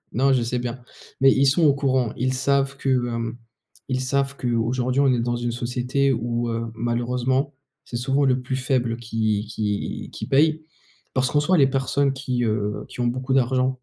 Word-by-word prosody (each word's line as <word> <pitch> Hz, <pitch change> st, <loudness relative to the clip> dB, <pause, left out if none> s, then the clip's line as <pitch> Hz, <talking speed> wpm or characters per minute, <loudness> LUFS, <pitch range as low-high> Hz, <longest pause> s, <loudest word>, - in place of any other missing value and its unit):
Non, 135 Hz, +2 st, +3 dB
je 125 Hz, -3 st, +2 dB
sais 120 Hz, +1 st, -1 dB
bien, 125 Hz, +1 st, -4 dB, 0.4 s
mais 135 Hz, 0 st, +7 dB
ils 135 Hz, +1 st, +3 dB
sont 160 Hz, +5 st, +3 dB
au 145 Hz, -3 st, +6 dB
courant. 130 Hz, -4 st, 0 dB
Ils 130 Hz, +2 st, 0 dB
savent 140 Hz, +1 st, +1 dB
que, 135 Hz, -, -6 dB
heu, 120 Hz, -2 st, 0 dB, 0.5 s
ils 130 Hz, 0 st, 0 dB
savent 140 Hz, +1 st, 0 dB
qu'aujourd'hui, 125 Hz, +2 st, 0 dB
on 140 Hz, -, +4 dB
est 120 Hz, -, +1 dB
dans 120 Hz, +1 st, 0 dB
une 120 Hz, 0 st, -2 dB
société 125 Hz, +3 st, 0 dB
où, 120 Hz, 0 st, -2 dB
heu, 115 Hz, 0 st, -2 dB
malheureusement, 125 Hz, +4 st, -1 dB, 0.3 s
c'est 120 Hz, -, -5 dB
souvent 135 Hz, +4 st, +1 dB
le 130 Hz, -1 st, +2 dB
plus 130 Hz, +1 st, -3 dB
faible 125 Hz, -3 st, 0 dB
qui 110 Hz, -2 st, -1 dB
qui 105 Hz, -1 st, -3 dB
qui -, -, -6 dB
paye 155 Hz, +3 st, +3 dB, 0.5 s
parce 130 Hz, -1 st, +2 dB
qu'en 145 Hz, -, +3 dB
soit 175 Hz, +4 st, +2 dB
les 135 Hz, -2 st, +6 dB
personnes 135 Hz, +1 st, +1 dB
qui, 130 Hz, -2 st, -2 dB
heu, 105 Hz, -1 st, -1 dB
qui -, -, -12 dB
ont 120 Hz, -, +1 dB
beaucoup 130 Hz, +2 st, -1 dB
d'argent 130 Hz, 0 st, +2 dB
125 Hz, 190 wpm, -23 LUFS, 120-135 Hz, 0.5 s, mais